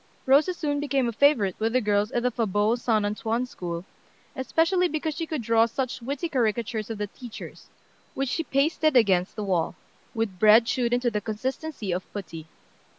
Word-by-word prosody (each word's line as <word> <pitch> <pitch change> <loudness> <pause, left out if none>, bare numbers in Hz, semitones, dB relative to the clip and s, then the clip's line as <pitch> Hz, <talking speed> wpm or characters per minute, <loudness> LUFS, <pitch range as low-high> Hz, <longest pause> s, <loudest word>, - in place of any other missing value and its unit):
Rosa 295 +7 +4
soon 290 -4 -1
became 275 -3 0
a - - -1
favorite 225 -6 +3
with 225 +1 0
the 255 - +4
girls 210 -2 +1
in 240 -2 -1
the 250 - +2
Fauborg 220 0 +1
St. 220 -4 +1
Antoine 225 +3 -1
School, 175 -7 -6 0.5
especially 330 +7 +2
because 315 0 -2
she 325 +2 -4
could 305 -7 -3
draw 230 0 +4
such 255 +1 -3
witty 280 +7 -3
caricatures 225 -5 -1
of 225 - -4
the 210 - -2
teachers, 235 +3 -11 0.5
which 270 -1 -1
she 325 - -1
pasted 305 +1 +1
against 190 -5 +3
the 215 - -4
wall, 180 -5 0 0.4
with 215 -5 -2
bread 220 +3 +7
chewed 240 0 0
into 245 0 +1
the 210 -1 -2
consistency 245 - -4
of 180 +1 -4
putty. 165 -5 -7
235 Hz, 180 wpm, -26 LUFS, 210-275 Hz, 0.5 s, bread